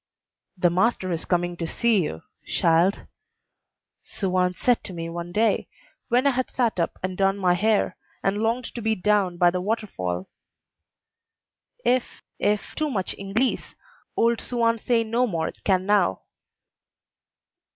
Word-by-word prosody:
"The 175 -1 +3
master 185 0 +1
is 165 -1 -2
coming 175 -1 0
to 165 - -3
see 230 +1 +2
you, 80 - -4 0.2
shild," 170 +4 +2 1.0
Suan 185 -2 -1
said 245 +4 +2
to 190 - -7
me 165 -1 -5
one 170 +1 -5
day, 220 +5 +1 0.4
when 250 +3 +2
I 280 - +5
had 255 0 -1
sat 235 -7 0
up 170 - -1
and 185 0 -2
done 195 +1 +2
my 185 -3 +3
hair, 210 +3 +1 0.3
and 195 +1 +1
longed 230 +3 0
to 235 - -5
be 220 0 +1
down 195 -2 +1
by 175 0 +5
the 180 0 -2
water 215 +3 -1
fall; 90 - -4 1.6
"if, 250 +1 0 0.2
if 210 0 0
too 310 -1 -1
much 195 -8 -2
Inglese 205 +6 -1 0.4
old 230 0 +2
Suan 230 -2 +1
say 230 0 +2
no 235 +3 +1
more 165 -6 -2
can 185 -2 +2
now." 200 - +2
195 Hz, 150 wpm, -25 LUFS, 175-230 Hz, 1.6 s, I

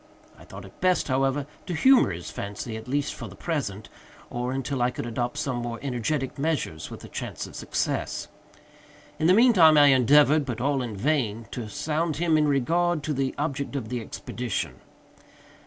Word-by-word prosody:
I - - -16
thought 95 0 -10
it 95 - -16
best, 180 -4 +2
however, 135 +2 +1 0.2
to 180 - -2
humor 260 - +5
his 85 -2 -6
fancy, 100 +3 -5
at 110 - -8
least 140 +2 -1
for - - -7
the - - -11
present, 120 - -3 0.4
or 125 +1 -2
until 135 0 -2
I 120 - +3
could 125 - -5
adopt 120 +1 -3
some 135 -3 -1
more 120 -1 -4
energetic 135 +2 -2
measures 140 - -2
with - - -10
a - - -8
chance - - -5
of - - -12
success. - - -2 0.9
In 160 - +2
the 185 - +6
mean 240 +2 +6
time 160 -6 +7
I 145 -1 +8
endeavored, 145 +4 +5
but 120 -4 -4
all 135 +1 +1
in 115 -4 -4
vain, 115 -3 0
to 115 -4 -5
sound 155 +7 -1
him 165 -1 +2
in 155 -1 +3
regard 160 +4 +1
to 150 - -1
the 135 -1 -1
object 140 -1 -3
of 120 -6 -3
the 125 -1 -3
expedition. 120 0 -4
135 Hz, 190 wpm, -26 LUFS, 120-155 Hz, 0.9 s, I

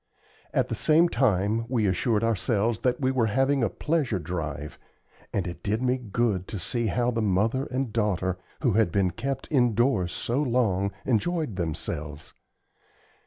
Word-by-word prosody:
At - - +1
the - - -2
same 165 +3 +4
time 110 - +1
we 120 -4 +1
assured 105 +4 +1
ourselves 115 0 +1
that 125 -1 0
we 130 -2 +1
were 125 -4 +2
having 135 +4 +2
a 115 - +2
pleasure 150 - 0
drive; 75 -4 -5 0.5
and 100 - -1
it 85 - -6
did 110 +4 -1
me 130 0 +1
good 110 -4 -1
to 110 - -5
see 115 +5 -1
how 120 +3 +1
the 115 -1 -1
mother 110 +6 +1
and 130 -3 -3
daughter, 95 -5 0 0.2
who 125 - +3
had 105 -3 +2
been 95 -1 +2
kept 135 +5 -4
indoors 120 - +2
so 120 +9 -1
long, 110 -8 +1
enjoyed 150 - 0
themselves. 75 -3 -4
115 Hz, 160 wpm, -26 LUFS, 95-125 Hz, 0.5 s, same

